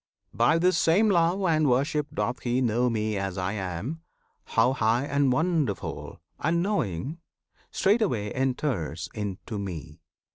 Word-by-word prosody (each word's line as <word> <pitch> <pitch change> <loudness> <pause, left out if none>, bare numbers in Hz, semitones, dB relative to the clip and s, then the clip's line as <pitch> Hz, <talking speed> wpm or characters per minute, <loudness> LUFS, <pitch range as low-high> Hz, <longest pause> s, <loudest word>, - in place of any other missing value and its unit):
By 120 +8 +3
this 175 0 +3
same 200 +6 +4
love 175 +2 +2
and 155 -5 +3
worship 145 +4 +1
doth 125 - -2
he 120 +1 0
know 120 0 +2
Me 110 -2 -1
as 95 -1 -3
I 90 +1 -1
am, 100 - -4 0.4
how 130 - +2
high 115 +2 +1
and 140 -2 +2
wonderful, 155 - -1 0.2
And 170 +3 +1
knowing, 150 - -2 0.5
straightway 190 - +1
enters 125 - -2
into 105 0 -5
Me. 80 -5 -7
125 Hz, 135 wpm, -27 LUFS, 100-160 Hz, 0.5 s, same